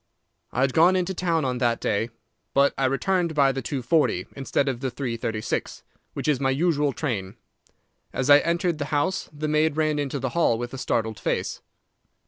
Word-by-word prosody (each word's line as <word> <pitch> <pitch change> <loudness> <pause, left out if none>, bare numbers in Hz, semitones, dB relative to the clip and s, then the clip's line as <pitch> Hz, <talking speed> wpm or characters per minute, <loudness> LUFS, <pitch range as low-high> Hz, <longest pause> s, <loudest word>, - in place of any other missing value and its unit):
"I - - -1
had 135 -1 +2
gone 175 +4 +5
into 185 0 0
town 170 -4 0
on 125 -1 -1
that 120 -2 +1
day, 110 +2 0 0.5
but 140 +1 +4
I 135 - 0
returned 170 +5 0
by 140 -2 +4
the 135 0 -4
2.40 130 - 0
instead 135 +1 -1
of 130 -3 -1
the 130 0 -2
3.36, 115 -4 -3 0.3
which - - -4
is 145 -4 +2
my 135 -1 +1
usual 145 0 +1
train. 110 -10 -3 0.8
As 135 - -2
I 145 0 +8
entered 170 0 0
the 145 - -1
house 150 +6 -1
the 155 +1 -4
maid 155 0 +2
ran 155 -1 +1
into 140 -1 -2
the 130 -1 -2
hall 145 -6 +2
with 120 +2 -5
a 135 - -5
startled 110 -3 -1
face. - - -2
140 Hz, 185 wpm, -25 LUFS, 125-155 Hz, 0.8 s, I